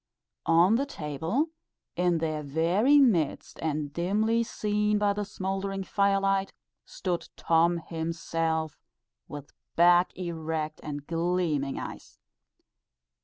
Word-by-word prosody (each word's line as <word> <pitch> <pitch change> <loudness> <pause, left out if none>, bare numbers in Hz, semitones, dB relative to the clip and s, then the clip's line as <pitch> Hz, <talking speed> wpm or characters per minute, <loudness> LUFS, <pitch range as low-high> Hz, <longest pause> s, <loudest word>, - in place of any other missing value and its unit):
on 170 +7 +5
the 275 - 0
table, 165 - -2 0.4
in 175 -1 +2
their 155 -1 -2
very 170 - +3
midst, 195 - +2
and 150 -2 -2
dimly 215 +7 +1
seen 210 -2 0
by 205 -1 +2
the 210 +1 -2
smouldering 195 -1 -3
firelight, 195 0 +1 0.3
stood 180 -2 -4
Tom 170 +1 +2
himself, 165 -1 -3 0.5
with 145 -1 -9 0.2
back 175 +1 +5
erect 160 -3 -3
and 145 -1 -6
gleaming 165 -4 -1
eyes. - - -8
175 Hz, 105 wpm, -28 LUFS, 160-200 Hz, 0.5 s, on